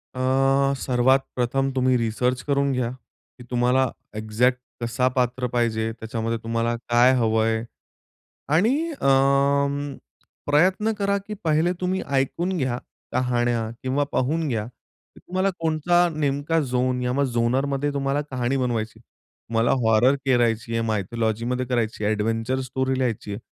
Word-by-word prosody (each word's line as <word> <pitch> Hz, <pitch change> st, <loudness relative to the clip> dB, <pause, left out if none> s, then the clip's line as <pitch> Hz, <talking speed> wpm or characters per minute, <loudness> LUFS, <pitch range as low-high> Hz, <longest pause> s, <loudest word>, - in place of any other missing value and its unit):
अ, 130 Hz, -, -3 dB, 0.6 s
सर्वात 130 Hz, +1 st, +2 dB
प्रथम 135 Hz, +2 st, 0 dB
तुम्ही 130 Hz, 0 st, +3 dB
रिसर्च 125 Hz, +2 st, 0 dB
करून 140 Hz, -1 st, +2 dB
घ्या 125 Hz, -2 st, -1 dB
की 125 Hz, 0 st, -17 dB
तुम्हाला 125 Hz, +1 st, +2 dB, 0.3 s
एक्झॅक्ट 110 Hz, +4 st, +1 dB, 0.2 s
कसा 120 Hz, +2 st, 0 dB
पात्र 125 Hz, 0 st, 0 dB
पाहिजे, 115 Hz, -2 st, 0 dB
त्याच्यामध्ये 115 Hz, 0 st, -3 dB
तुम्हाला 115 Hz, +1 st, -1 dB
काय 120 Hz, +1 st, +3 dB
हवं 110 Hz, -2 st, +2 dB
आहे 110 Hz, 0 st, 0 dB, 0.9 s
आणि 215 Hz, +10 st, +4 dB, 0.2 s
अ, 280 Hz, -, -3 dB, 1.4 s
प्रयत्न 185 Hz, +8 st, +3 dB
करा 200 Hz, -1 st, +1 dB
की 210 Hz, -, -4 dB
पहिले 160 Hz, +2 st, +2 dB
तुम्ही 185 Hz, +1 st, 0 dB
ऐकून 170 Hz, +8 st, 0 dB
घ्या 130 Hz, -5 st, -1 dB, 0.4 s
कहाण्या 120 Hz, -2 st, 0 dB
किंवा 130 Hz, +3 st, +1 dB
पाहून 155 Hz, +5 st, 0 dB
घ्या 110 Hz, -6 st, -1 dB
की 120 Hz, 0 st, -20 dB
तुम्हाला 185 Hz, +2 st, -1 dB
कोणता 165 Hz, +2 st, +2 dB
नेमका 145 Hz, +2 st, 0 dB
झोन 125 Hz, -2 st, 0 dB
या 125 Hz, +3 st, 0 dB
झोनरमध्ये 135 Hz, +3 st, 0 dB
तुम्हाला 140 Hz, +1 st, 0 dB
कहाणी 125 Hz, +1 st, 0 dB
बनवायची 115 Hz, -4 st, -1 dB
आहे. -, -, -20 dB, 0.5 s
तुम्हाला 115 Hz, +1 st, +2 dB
हॉरर 115 Hz, +4 st, +4 dB
करायची 120 Hz, -3 st, +1 dB
आहे, 115 Hz, -, +1 dB
मायथॉलॉजीमध्ये 115 Hz, +3 st, -1 dB
करायची 115 Hz, -4 st, -1 dB
आहे, 105 Hz, -, +2 dB
एडव्हेंचर 115 Hz, +4 st, -1 dB
स्टोरी 130 Hz, +1 st, -1 dB
लिहायची 120 Hz, -5 st, -2 dB
आहे. 100 Hz, -, -5 dB
125 Hz, 135 wpm, -24 LUFS, 115-135 Hz, 1.4 s, आणि